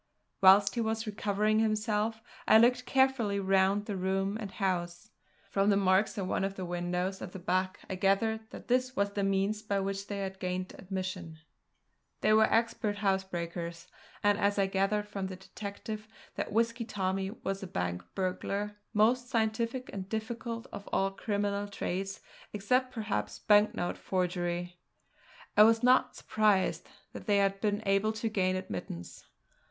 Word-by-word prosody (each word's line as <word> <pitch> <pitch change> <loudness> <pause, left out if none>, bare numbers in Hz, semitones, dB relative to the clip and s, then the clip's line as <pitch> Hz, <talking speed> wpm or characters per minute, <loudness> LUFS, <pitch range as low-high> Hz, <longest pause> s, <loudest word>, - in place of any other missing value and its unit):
Whilst 195 +1 +7
he 235 - -1
was 220 0 -1
recovering 210 0 +1
himself 220 0 0 0.2
I 220 - +8
looked 250 +2 +4
carefully 265 -7 +2
round 195 +1 +2
the 205 - -3
room 190 +2 0
and 205 - -4
house. 180 0 -2 0.4
From 195 +1 +2
the 200 - +4
marks 195 +2 +2
at 195 - -1
one 185 - -1
of 195 0 -2
the 185 - -4
windows 180 +2 -2
at 180 - -7
the - - -6
back 185 +1 -1
I - - -4
gathered 220 +4 +1
that - - -10
this 255 +1 +1
was 200 0 +1
the 200 - -2
means 195 +2 +1
by 205 -2 -1
which 195 +1 -3
they 205 - -4
had 190 0 -5
gained 185 0 -3
admission. 185 -3 -5 0.8
They 215 - +4
were 220 0 +5
expert 225 -2 +1
housebreakers; 175 -4 -2 0.4
and 205 0 +3
as 200 0 +2
I 195 - +3
gathered 195 +2 0
from 195 -2 -4
the 190 - -6
detective 210 +3 -7 0.3
that - - -4
Whisky 230 +2 +1
Tommy 195 -3 -2
was 195 -2 -4
a 190 - -5
bank 90 - -2
burglar 200 +2 -2 0.2
most 245 +4 +3
scientific 230 +1 -1
and 190 -1 -5
difficult 230 +1 -4
of 200 - -8
all 195 0 +1
criminal 205 0 -2
trades, 195 -1 -4 0.3
except 250 +6 +1
perhaps, 220 -4 -3
banknote 205 -4 +2
forgery 175 -1 -2 0.8
I 210 - +7
was 225 +2 +6
not 250 +1 +4
surprised 210 -3 +1 0.2
that - - -9
they 205 -1 +4
had 195 0 +1
been 205 -1 0
able 195 +2 +2
to 220 +1 -2
gain 185 -3 +1
admittance. 90 - -6
200 Hz, 160 wpm, -31 LUFS, 190-215 Hz, 0.8 s, I